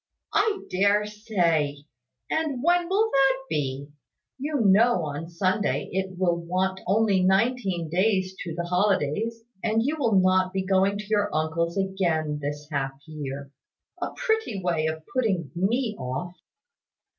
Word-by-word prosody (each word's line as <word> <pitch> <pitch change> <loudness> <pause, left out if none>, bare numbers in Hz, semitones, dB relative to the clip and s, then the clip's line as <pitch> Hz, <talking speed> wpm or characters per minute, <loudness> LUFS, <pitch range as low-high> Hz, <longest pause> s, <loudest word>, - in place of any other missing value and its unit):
"I 415 -2 +2
dare 200 +2 +3
say! 170 -10 0 0.4
And 300 -5 -1
when 350 +1 +3
will 430 +4 +2
that 270 -1 +4
be? 140 - -3 0.5
You 290 0 -1
know 205 -2 +4
on 150 +3 -5
Sunday 185 +4 0
it 190 -1 -3
will 175 -2 +2
want 185 +2 -1
only 200 -1 +3
nineteen 190 -2 +1
days 185 +2 +1
to 170 -3 -5
the 170 - -2
holidays; 195 +4 0 0.2
and 225 +1 +2
you 300 +5 -1
will 230 -7 +2
not 185 0 +3
be 190 -1 -1
going 195 +1 +2
to 210 - -6
your 205 -1 +1
uncle's 160 +3 -1
again 170 -6 0
this 145 +1 -4
half 135 -2 -1
year. 140 -3 -6 0.5
A - - -1
pretty 445 - 0
way 170 -4 0
of 160 0 -4
putting 195 - 0
me 220 +5 0
off!" 130 +8 -4
190 Hz, 145 wpm, -26 LUFS, 165-220 Hz, 0.5 s, that